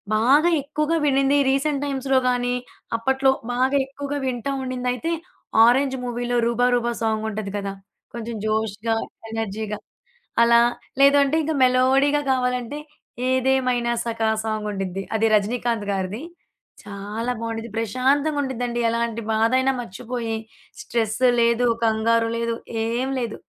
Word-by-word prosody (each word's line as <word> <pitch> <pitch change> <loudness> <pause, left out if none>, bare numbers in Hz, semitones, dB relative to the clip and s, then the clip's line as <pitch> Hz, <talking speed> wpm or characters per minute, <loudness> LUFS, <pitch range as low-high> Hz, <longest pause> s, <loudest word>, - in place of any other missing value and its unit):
బాగా 275 +10 +4
ఎక్కువగా 305 +3 -1
విన్నింది. 275 0 +3
రీసెంట్ 275 +1 +1
టైమ్స్‌లో 270 -1 0
గానీ, 245 0 0 0.4
అప్పట్లో 265 +3 +2 0.2
బాగా 260 +3 +1
ఎక్కువగా 285 +1 -5
వింటా 255 +1 -2
ఉండిందయితే 255 +4 -2 0.5
'ఆరెంజ్' 265 +3 +4
మూవీలో 245 0 -2
రూబా 235 +1 +2
రూబా 240 0 0
సాంగ్ 220 -1 0
ఉంటది 210 -2 -4
కదా! 200 -1 -4 0.4
కొంచెం 235 -1 -5
జోష్‌గా, 220 +1 -1 0.4
ఎనర్జీగా 215 -1 -3 0.7
అలా. 235 0 +6 0.4
లేదు 280 +1 +6
అంటే 280 +3 0
ఇంక 320 - -1
మెలోడీగా 265 +3 +3
కావాలంటే 250 +1 -1 0.5
'ఏదేమైనా 255 -2 +1
సఖ' 230 -1 -2 0.2
సాంగుండిది. 200 -3 -3
అది 220 0 +2
'రజనీకాంత్' 225 0 0
గారిది. 195 +5 -3 0.6
చాలా 210 +4 -4
బావుండేది. 230 0 -4
ప్రశాంతంగా 270 +7 +1
ఉండేదండి. 245 -2 -3
ఎలాంటి 230 0 -1
బాధయినా 255 +5 +2
మర్చిపోయి, 230 +1 -4 0.4
స్ట్రెస్ 230 +1 -2 0.2
లేదు, 235 +1 +3 0.2
కంగారు 225 +1 +2
లేదు, 230 0 -1 0.3
ఏం 245 +3 -1
లేదు. 235 -3 -4
240 Hz, 115 wpm, -23 LUFS, 225-265 Hz, 0.7 s, అలా